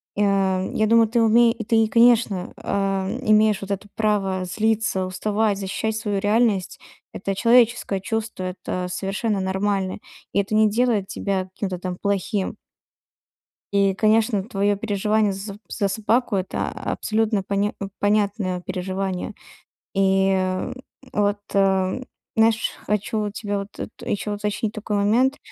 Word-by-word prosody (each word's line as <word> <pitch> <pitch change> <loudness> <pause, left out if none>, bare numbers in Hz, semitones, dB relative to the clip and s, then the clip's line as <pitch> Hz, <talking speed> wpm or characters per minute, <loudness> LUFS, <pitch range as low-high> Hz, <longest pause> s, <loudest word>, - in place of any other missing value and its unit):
Я 195 -2 +1
я 215 - +2
думаю, 230 0 +5
ты 230 +2 +1
умее 230 +1 +5
ты, 225 -1 +4
конечно, 230 -5 +3
э, - - -13
м, 195 +2 0
имеешь 215 -1 +4
вот 195 0 -6
это 200 +1 -3
право 195 -4 0
злиться, 220 0 0
уставать, 205 +3 0
защищать 205 +3 -2
свою 210 -3 -1
реальность. 205 -2 +1 0.3
Это 195 +1 -3
человеческое 230 -3 +3
чувство, 220 -1 -3
это 185 0 -4
совершенно 195 +3 -2
нормально. 190 0 -1 0.3
И - - +2
это 200 +2 -1
не 215 0 +5
делает 220 -3 +1
тебя 190 -2 -2
каким-то 185 -1 -5
там 180 0 -4
плохим. 200 0 -1 1.2
И, 200 -1 +3
конечно, 215 0 +2
твоё 205 -1 0
переживание 210 0 +1
за 195 +1 -6
соб 205 - -13
за 200 - 0
собаку- 220 +3 +1
это 190 -1 -2
абсолютно 215 -2 -1
поня 200 +2 0
э, 200 - -3
понятное 205 -3 +1
переживание. 185 +1 -3 0.6
И 190 -1 +2 0.4
вот, 205 0 +1 0.2
э, - - +4
м, 190 +4 +1 0.3
знаешь, 225 0 +3
хочу 210 +1 -1
вот 210 -1 -2
тебе 205 -1 -3
вот 200 0 -5
тут - - -7
ещё 205 +1 -2
уточнить 210 +1 -2
такой 210 -1 -3
момент: 235 +7 +2
205 Hz, 140 wpm, -23 LUFS, 195-220 Hz, 1.2 s, думаю